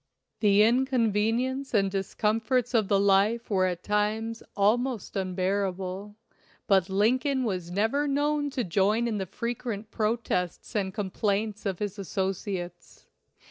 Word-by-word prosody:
The 210 -1 +5
inconvenience 245 +1 +1
and 195 -2 +3
discomforts 220 +5 0
of 220 -4 +3
the 200 0 +3
life 200 +4 +2
were 185 -2 +3
at 180 -1 -4
times 215 +2 -1 0.2
almost 230 +3 +1
unbearable, 190 +1 -2 0.5
but 190 -2 +3
Lincoln 255 +7 +2
was 185 -7 -2
never 225 +10 +1
known 290 +1 +1
to 265 -3 -2
join 205 +6 +2
in 215 -3 -1
the 190 - -3
frequent 225 0 -4
protests 215 -3 -2
and 195 -3 0
complaints 205 +1 -2
of 190 -2 -2
his 205 +1 -4
associates. 190 -1 -4
210 Hz, 125 wpm, -27 LUFS, 195-235 Hz, 0.5 s, The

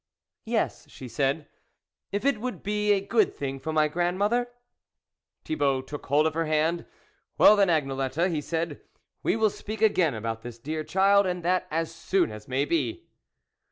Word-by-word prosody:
"Yes," - - -2
she 130 - -10
said, 140 +4 -1 0.6
"if 205 +5 -2
it 275 -7 +2
would 250 0 -4
be 210 +1 +1
a 195 -1 +2
good 220 0 +2
thing 135 -1 -4
for 160 - -4
my 155 -1 +3
grandmother? 195 +9 0 0.5
" - - -58
Thibault 140 -4 0
took 145 +2 -8
hold 145 +3 +3
of 160 - +1
her 165 0 -1
hand. 155 +2 0 0.2
" - - -44
Well 210 - +8
then, 200 -1 +4
Agnelette," 135 +2 0
he 155 -3 -1
said 165 -1 -3 0.2
" - - -52
we - - +1
will 220 -2 +2
speak 215 +2 -7
again 185 - +3
about 115 +1 -4
this, 120 0 -8
dear 155 +6 -4
child, 195 +3 +4
and 180 -1 -3
that 180 +1 +1
as 165 +1 -2
soon 175 - 0
as 105 0 -10
may 130 +2 0
be." 145 -7 -2
160 Hz, 185 wpm, -27 LUFS, 140-195 Hz, 0.6 s, Well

